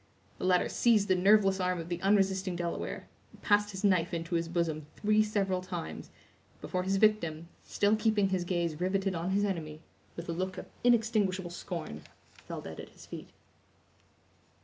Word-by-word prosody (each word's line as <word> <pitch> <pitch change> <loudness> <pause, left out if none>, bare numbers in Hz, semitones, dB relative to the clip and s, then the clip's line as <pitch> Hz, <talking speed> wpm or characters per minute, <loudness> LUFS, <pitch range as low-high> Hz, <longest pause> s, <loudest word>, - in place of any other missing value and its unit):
The - - -3
latter 180 -1 +3
seized 215 -4 +3
the 185 - +5
nerveless 195 +1 +4
arm 180 0 0
of 165 - -6
the 175 0 -4
unresisting 195 -2 +2
Delaware, 170 0 -4 0.2
and - - -18
passed 205 0 +3
his 190 0 -7
knife 180 -3 +2
into 165 +1 -4
his 165 -1 +1
bosom 165 -3 -1
three 215 0 +3
several 195 -3 0
times, 80 - -6 0.5
before 180 - -2
his 190 +2 0
victim, 170 -6 +2
still 205 +1 +1
keeping 215 -3 +2
his 185 -2 0
gaze 170 -3 -2
riveted 190 +1 0
on 170 +1 -2
his 200 +2 +2
enemy, 160 -6 -3 0.4
with 170 - -7
a - - -2
look 185 +2 -3
of - - -6 0.2
inextinguishable 215 -7 +2
scorn, 165 - -6 0.5
fell - - -5
dead - - -8
at - - -8
his - - -15
feet. - - -8
185 Hz, 170 wpm, -31 LUFS, 170-205 Hz, 0.5 s, the